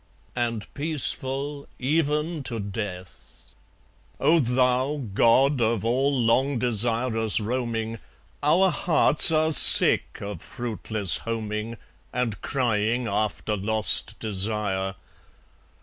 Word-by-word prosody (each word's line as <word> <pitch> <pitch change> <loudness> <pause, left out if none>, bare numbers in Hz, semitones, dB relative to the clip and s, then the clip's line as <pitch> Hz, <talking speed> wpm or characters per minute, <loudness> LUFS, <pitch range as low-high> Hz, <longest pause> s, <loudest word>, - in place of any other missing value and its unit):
And 115 -3 -3
peaceful 140 -1 -2
even 150 +3 -2
to 115 -3 -5
death.... 100 -3 -9 0.7
O 160 +4 +3
Thou, 130 +2 0
God 130 +5 +2
of 115 -1 -1
all 135 +3 0
long 125 +4 +1
desirous 115 -1 0
roaming, 115 -1 -4 0.4
Our 175 +6 +2
hearts 155 -3 +4
are 155 0 +1
sick - - +7
of 100 0 -8
fruitless 110 - -3
homing, 110 0 -5 0.3
And 120 -6 -4
crying 120 -2 -1
after 105 +1 -3
lost 110 +1 +2
desire. 100 -2 -3
115 Hz, 95 wpm, -24 LUFS, 110-135 Hz, 0.7 s, sick